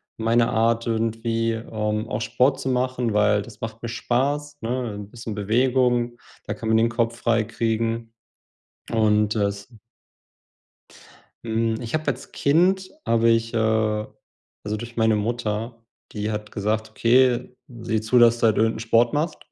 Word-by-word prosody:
meine 115 +1 +2
Art 115 0 +1
irgendwie, 115 0 0
ähm, 110 -1 -3
auch 105 - -3
Sport 125 +4 +2
zu 130 - -2
machen, 125 -2 0
weil 105 0 +3
das 110 +1 -12
macht 115 +1 -6
mir 120 - -3
Spaß, 140 +5 -1
ne? 120 -1 -2
'N 100 -1 -8
bisschen 115 -2 -7
Bewegung, 120 +2 +1 0.3
da - - -3
kann 110 - -5
man 110 - +4
den 115 +1 +4
Kopf 115 0 -1
frei 115 -1 +1
kriegen 115 +1 -2 0.8
und 105 -2 +2
es 100 -2 -2 1.8
Hm, 115 0 -1
ich 115 -1 -6
habe 155 0 -2
als - - -3
Kind 185 +6 +2
habe 115 0 +3
ich, 115 0 +1
äh - - +1 1.1
also 105 +1 -3
durch 120 +2 -8
meine 110 -1 +3
Mutter, 115 +1 -3 0.3
die 105 0 -3
hat 105 0 -5
gesagt: 110 +2 -2
„Okay, 125 +1 +2
sieh 115 -4 -3
zu, 115 +3 +2
dass 120 0 +6
du - - +2
halt 110 - +2
irgend 110 +1 +2
'n - - -6
Sport 115 +1 +2
machst.“ 155 +2 -1
115 Hz, 155 wpm, -23 LUFS, 110-120 Hz, 1.8 s, dass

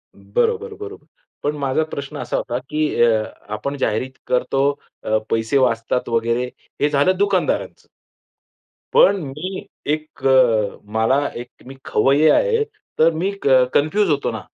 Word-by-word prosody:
बरोबर, 465 -1 -1
बरोबर. 420 0 -9 0.4
पण 145 +1 0
माझा 140 +2 0
प्रश्न 140 -3 -6
असा - - -2
होता, 120 - -2
की 155 0 0
अ 110 -2 +3 0.3
,आपण 140 +6 -4
जाहिरीत 130 0 -1 0.2
करतो, 135 +2 +1 0.4
अ, 110 - +1
पैसे 115 +4 +1
वाचतात 125 -1 0
वगैरे, 115 +1 +1 0.4
हे 145 - +3
झालं 150 +6 +2
दुकानदारांचं. 200 -2 0 1.1
पण 475 - +6
मी 155 +8 -6 0.3
एक 155 0 -7
अ, 120 -6 +3 0.2
मला 130 +6 +2
एक 120 - -11 0.2
मी 135 - -9
खवय्ये 145 +4 +3
आहे 460 -3 +3 0.4
तर 165 +1 +6
मी 180 +5 -1
क 130 -2 +5
कन्फ्यूज 175 +7 +2
होतो 145 -2 0
ना, - - -5
140 Hz, 140 wpm, -20 LUFS, 125-180 Hz, 1.1 s, पण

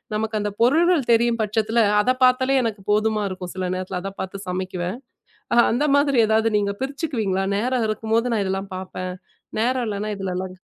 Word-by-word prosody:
நமக்கு 220 0 -1
அந்தப் 205 0 -4
பொருள்கள் 320 +2 +3
தெரியும் 235 0 +3
பட்சத்தில 220 +2 +1 0.2
அதப் 255 +4 0
பார்த்தாலே 260 +2 +4
எனக்குப் 210 -3 -4
போதுமா 215 0 +1
இருக்கும் 180 -1 -7
சில 185 -1 -2
நேரத்துல. 185 0 -4
அதப் 195 0 -7
பார்த்துச் 195 +1 -7
சமைக்குவேன். 185 +2 -3 0.7
அந்த 270 +6 +1
மாதிரி 280 -3 +2
ஏதாவது 220 +1 +2
நீங்கப் 200 +1 -2
பிரிச்சுக்குவீங்களா? 240 - -2
நேரம் 245 +1 0
இருக்கும்போது 225 +2 0
நான் 210 - +1
இதெல்லாம் 195 +1 -3
பார்ப்பேன். 185 -1 -5 0.5
நேரம் 250 +1 +1
இல்லைன்னா 210 +1 -3
இதுலல்லாம் 185 -1 -4
215 Hz, 160 wpm, -22 LUFS, 195-240 Hz, 0.7 s, பார்த்தாலே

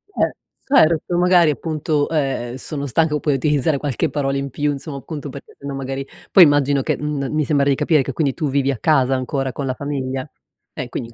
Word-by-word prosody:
Eh - - +1 0.4
certo, 170 - +4
magari 180 -2 +5
appunto, 155 -1 -1
ehm, 135 -6 -1
sono 140 +2 -5
stanco 150 +3 +1
poi 150 - 0
utilizzare 145 +2 +1
qualche 140 -3 -1
parola 135 -1 -1
in 140 0 -3
più 145 +4 0
insomma, 140 +1 -6
appunto 145 +1 -7
perché 140 +1 -11
sennò 140 0 -6
magari, 135 0 -4 0.3
poi 190 - +9
immagino 145 -2 +3
che - - 0
m 150 -2 -2
mi 155 0 +1
sembra 140 -1 +2
di 140 - +3
capire 155 +1 +2
che - - -5
quindi 145 -5 0
tu 150 -1 -2
vivi 140 0 +1
a 135 - -3
casa, 135 -4 +3
ancora 130 +1 -2
con 140 +3 -5
la 130 - -1
famiglia? 135 0 -4 0.4
Eh, - - -5
quindi 115 - -5
in - - -17
140 Hz, 210 wpm, -20 LUFS, 135-150 Hz, 0.4 s, poi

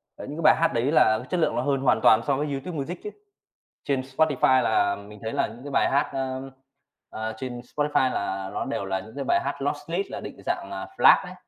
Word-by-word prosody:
ờ, - - -8
những 145 +3 -7
cái - - -4
bài 155 +1 +7
hát 165 0 +2
đấy 120 +5 +1
là 110 -8 +4
chất 180 - 0
lượng - - +1
nó 120 - +1
hơn 135 0 0
hoàn 130 - +3
toàn 110 0 +6
so 140 - +3
với 150 +2 -1
YouTube 150 +4 -4
Music 160 +6 -4
chứ. 420 - -4 0.7
Trên 135 -2 0
Spotify 135 -1 +2
là 100 -2 +2
mình 100 +1 -12
thấy 110 - -3
là - - +1
những 115 +4 -12
cái 145 - -7
bài - - +2
hát, 140 - +2
a, 130 -1 -2 0.7
à, 110 0 -4
trên 125 -1 -5
Spotify 140 0 0
là 95 -1 -3
nó - - -2
đều 100 - -3
là 95 0 -1
những 110 +6 -12
cái 140 - -3
bài - - +3
hát 140 0 -4
là 140 - +1
lossless 165 +6 -4
định - - -8
dạng 100 - -2
là 95 -1 -5
FLAC - - +6
đấy. - - -8
130 Hz, 245 wpm, -25 LUFS, 110-145 Hz, 0.7 s, bài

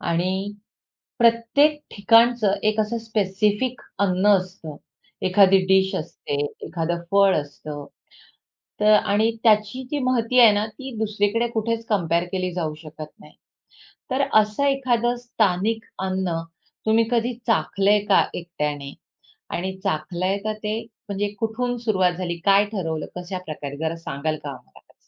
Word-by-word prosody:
आणि 185 +4 -1 0.7
प्रत्येक 235 +6 +3
ठिकाणचं 230 0 +4 0.2
एक 215 0 -1
असं 225 +2 -1
स्पेसिफिक 215 +3 -1 0.2
अन्न 185 +1 +1
असतं. 180 -5 -8 0.5
एखादी 195 0 +6
डीश 190 +1 +3
असते, 155 -4 -5 0.3
एखादं 170 0 -2
फळ 200 -1 +5
असतं. 145 0 -6 1.0
तर 215 0 +5
आणि 210 +2 +3
त्याची 215 +2 +3
जी 295 - -1
माहिती 250 0 +2
आहे 225 -3 +8
ना, 205 +1 0
ती 245 +4 -9
दुसरीकडे 215 +2 0
कुठेच 230 +1 -1
कंपेअर 170 -5 +1
केली 185 -1 -2
जाऊ 160 -4 -2
शकत 155 -1 -9
नाही. - - -16 0.8
तर 270 +1 +1 0.2
असं 210 +6 -2
एखादं 245 -3 +1
स्थानिक 225 -2 0
अन्न, 185 -3 -1 0.5
तुम्ही 220 +1 +4
कधी 240 0 +1
चाखलंय 210 -3 +2
का 195 - +5
एकट्याने? 150 -5 -4 0.6
आणि 190 +2 -4
चाखलंय 175 +5 -1
का 215 0 -1
ते 215 +2 -2 0.3
म्हणजे 200 +1 -1
कुठून 245 +2 -1
सुरुवात 200 -6 +1
झाली? 175 -2 -3
काय 200 +1 +5
ठरवलं, 165 -7 -3
कशा 180 +1 -5
प्रकारे 145 -2 -6
जरा 160 +1 -2
सांगाल 155 -1 -3
का 145 - -5
आम्हाला 130 -3 -12
त्याचं? - - -28
200 Hz, 135 wpm, -23 LUFS, 175-225 Hz, 1.0 s, आहे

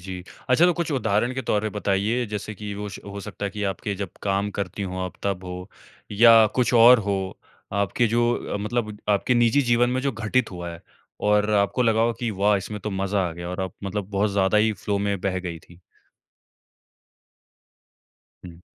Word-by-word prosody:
जी। 90 0 -7 0.3
अच्छा 130 +7 +5
तो 180 - +4
कुछ 170 -2 -2
उदाहरण 120 -1 +1
के 130 - -3
तौर 105 - +1
पे 110 - -1
बताइए 105 +4 0
जैसे 105 +1 -5
कि 105 0 -7
होश 105 0 -6
हो 100 0 -7
सकता 105 0 -7
है 100 - -1
कि 105 +2 -6
आपके 100 +2 -4
जब 95 -2 -5
काम 100 +1 0
करती 100 +1 -3
हो 95 -1 -4
आप 90 -1 -5
तब 95 -2 -2
हो 90 +1 -7 0.4
या 115 +1 +7
कुछ 125 -1 +1
और 120 +1 +8
हो। 95 -2 -3 0.3
आपके 100 +4 +1
जो 120 +2 +2 0.2
अ, - - +1
मतलब 105 0 -2
आपके 105 +4 +2
निजी 120 +4 +4
जीवन 120 0 +3
में 130 - 0
जो 140 -2 0
घटित 115 +2 0
हुआ 85 -2 -6
है, 85 - -11 0.4
और 105 0 +3
आपको 100 +5 +2
लगा 115 -1 +2
हो 115 0 +2
कि 120 -2 -1
"वाह! 100 +1 +2
इसमें 105 +2 -5
तो 105 - -4
मज़ा 95 -1 0
आ 80 - -6
गया।" 85 +1 -7
और 90 +1 -4
आप 95 -1 -4
मतलब 100 0 -3
बहुत 100 +1 +1
ज़्यादा 100 +1 +2
ही 110 +1 +3
फ़्लो 100 0 -2
में 100 -2 -1
बह 95 -1 -1
गई 85 -2 -5
थी? 85 +2 -19 2.7
हुँ। 85 0 -13
105 Hz, 200 wpm, -24 LUFS, 95-115 Hz, 2.7 s, और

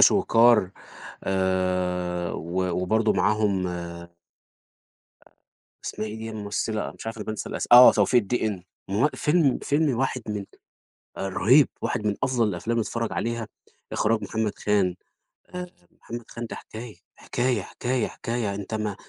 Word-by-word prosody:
شويكار 115 -5 +5 0.5
آآ، 90 -2 0
و 90 +3 -2 0.2
وبرضه 110 +4 +2
معاهم. 105 -3 +1
آآ 85 -1 -6 1.8
اسمها 110 - -4
إيه 105 - -6
دي 110 0 -6
الممثلة، 105 0 -3
مش - - -10
عارف 115 0 -4
أنا 105 - -6
بانسى 110 0 -4
الأس - - -3
آه، 125 +1 +11
توفيق 125 -2 +3
الدِقن 105 -3 -2 0.3
ما 100 - -2
هو 150 - +5
فيلم 150 -3 +2
فيلم 145 -3 +1
واحد 130 0 -1
من 105 -2 -3 0.7
آآ، 95 - -3
رهيب. 125 +9 +5
واحد 105 - -1
من 105 - +1
أفضل 120 -4 +2
الأفلام 105 +5 -2
اللي 115 - +1
تتفرج 115 0 -3
عليها، 115 -1 -2 0.4
إخراج 110 +1 +1
محمد 110 -2 -1
خان 100 -4 +1 0.6
آآ، 180 0 -4 0.3
محمد 120 0 -7
خان 120 0 -6
ده - - -7
حكاية، 110 0 -9 0.2
حكاية، 120 -3 -1
حكاية، 125 +5 -2
حكاية. 115 -4 -3
أنت 100 +2 -6
ما 105 -2 -2
110 Hz, 145 wpm, -25 LUFS, 95-120 Hz, 1.8 s, آه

